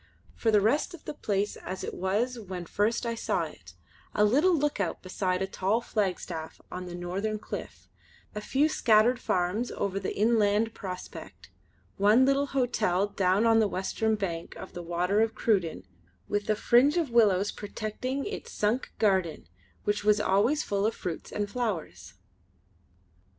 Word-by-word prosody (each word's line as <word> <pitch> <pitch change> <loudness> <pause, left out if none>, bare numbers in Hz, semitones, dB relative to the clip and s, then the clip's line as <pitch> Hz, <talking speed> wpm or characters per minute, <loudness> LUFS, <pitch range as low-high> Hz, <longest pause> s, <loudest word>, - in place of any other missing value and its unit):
For 230 - 0
the 210 -2 +5
rest 285 - +1
of 325 - -17
the - - -4
place 205 -6 -1
as 185 +1 -6
it - - -4
was 225 +7 -1
when 185 -4 -6
first 215 +7 0
I 230 - -1
saw 230 - -1
it, - - -10 0.4
a 210 - +4
little 305 - +4
lookout 285 - -1
beside 185 0 -1
a - - +1
tall 195 +3 0
flagstaff 185 -8 -3
on 180 0 -5
the 175 - -6
northern 190 +5 -2
cliff, - - -8 0.5
a 210 - -4
few 275 +7 +2
scattered 240 -3 +4
farms 185 +4 0
over 195 -1 -2
the 195 - -4
inland 220 0 +3
prospect, 185 -3 -8 0.5
one 210 +6 +5
little 275 +1 +2
hotel 225 -8 +1
down 195 +2 +2
on 225 -1 +5
the 220 - +4
western 215 +3 -1
bank 170 -5 -4
of - - -9
the 175 - -6
Water 175 +4 +1
of 225 0 +1
Cruden 185 - 0 0.4
with 205 0 -2
a 215 - +4
fringe 250 +9 +4
of 320 -7 0
willows 205 -4 +4
protecting 220 +6 -4
its 430 +3 -6
sunk 215 +5 -1
garden 190 -6 +1 0.4
which 205 0 0
was 210 0 +4
always 210 +9 +2
full 200 +1 0
of 225 - -2
fruits 170 -3 -5
and 205 -1 -2
flowers. 170 - -4
210 Hz, 160 wpm, -28 LUFS, 190-235 Hz, 0.5 s, the